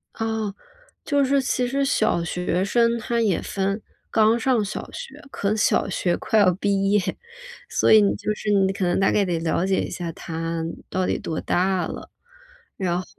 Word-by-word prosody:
啊， 220 -2 -2 0.5
就 285 -2 +2
是 275 +1 +2
其 250 -1 0
实 275 +3 0
小 270 -10 +1
学 180 +1 -1
生 235 +3 +2
她 235 +1 -1
也 210 -6 +1
分 195 +2 -2 0.3
刚 220 +1 +3
上 240 -2 +2
小 205 - -5
学 - - -9
可 200 -6 -2
能 215 - 0
小 215 - +2
学 175 -1 0
快 220 - +1
要 185 -3 +5
毕 195 0 0
业， 210 - +4 0.7
所 - - +2
以 220 - +8
你 200 - +2
就 215 - -2
是 210 0 -5
你 195 -1 +3
可 195 -1 -2
能 175 - +1
大 195 - +3
概 205 - +2
得 175 -2 -1
了 165 +2 0
解 190 0 +1
一 - - -4
下 175 -2 -5
她 165 +1 -4 0.3
到 185 0 -1
底 - - -1
多 160 - -4
大 185 0 +1
了。 - - -7 0.7
然 180 -3 -1
后 185 - -6
200 Hz, 210 characters per minute, -23 LUFS, 180-225 Hz, 0.7 s, 以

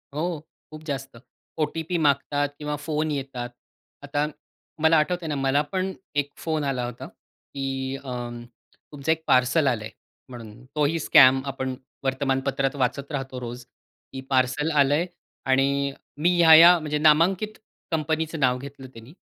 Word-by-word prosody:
हो, 150 - -1 0.5
खूप 155 0 -10
जास्त. 135 -4 -5 0.4
ओ-टी-पी 160 +3 -1
मागतात 145 -1 +1
किंवा 150 0 -3
फोन 155 0 -1
येतात. 135 -3 -4 0.5
आता 145 +1 -1 0.6
मला 160 0 +5
आठवतंय 170 +2 0
ना, 150 - -2
मला 135 +1 +2
पण 190 0 -1 0.2
एक 145 0 0
फोन 155 -2 -2
आला 130 -3 -1
होता, 120 0 -7
की 135 -1 -6
अ, 125 -2 -5 0.6
तुमचं 145 +2 -2
एक 160 0 -1
पार्सल 130 +4 +3
आलं 115 -4 0
आहे 110 - -7 0.4
म्हणून. 115 -2 -11
तोही 150 +2 +1
स्कॅम. 135 -3 +6
आपण 130 -1 -3 0.3
वर्तमानपत्रात 135 0 0
वाचत 140 +2 -2
राहतो 135 -3 -4
रोज, 120 0 -7 0.5
की 135 - -5
पार्सल 130 +4 +1
आलंय 145 +3 +3 0.4
आणि 140 +1 +2 0.3
मी 175 - +4
ह्या-ह्या 170 +1 +9
म्हणजे 150 -1 -2
नामांकित 170 +8 +3 0.4
कंपनीचं 160 0 -1
नाव 125 -2 +2
घेतलं 135 0 -10
त्यानी. 115 +5 -13
140 Hz, 140 wpm, -25 LUFS, 130-155 Hz, 0.6 s, ह्या-ह्या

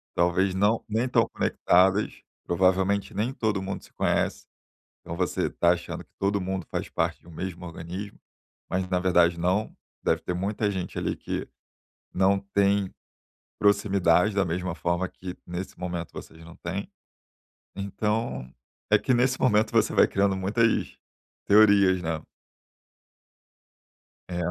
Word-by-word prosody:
Talvez 90 +2 +2
não 105 +4 +2
nem 115 +3 0
tão 115 -2 +3
conectadas, 95 +1 +2 0.2
provavelmente 95 +2 +1
nem 115 +5 -1
todo 105 -6 -1
mundo 95 +1 -5
se - - -17
conhece. - - 0 0.6
Então 85 - -6
você 90 -1 0
tá 85 - +3
achando 90 0 -6
que - - -32
todo 100 0 0
mundo 95 -1 -3
faz - - -3
parte - - -1
de - - -21
um - - -12
mesmo 90 +1 -6
organismo, 90 +4 -7 0.5
mas 95 0 -1
na 90 -1 +1
verdade 90 -2 +3
não. 95 +5 0 0.3
Deve - - +2
ter 90 - -3
muita 100 +4 -1
gente 95 -3 -4
ali - - -1
que, - - -4 0.7
não 95 +1 +3
tem 100 0 +1 0.7
proximidade 100 -2 +3
da 100 - +3
mesma 90 +1 -2
forma 85 +2 -1
que, 90 -1 -8
nesse 90 +2 -6
momento 85 -2 -4
vocês 80 0 -10
não 85 0 -12
têm. 95 +4 -5 0.9
Então, 100 - -2 0.4
é - - +6
que 130 - 0
nesse 125 +1 +2
momento 110 -3 +3
você - - +2
vai - - +5
criando 100 0 +1
muitas 110 +4 +1 0.5
teorias, 100 -3 +5
né? 80 -2 -2 2.1
É, 90 - -5
95 Hz, 140 wpm, -26 LUFS, 90-100 Hz, 2.1 s, é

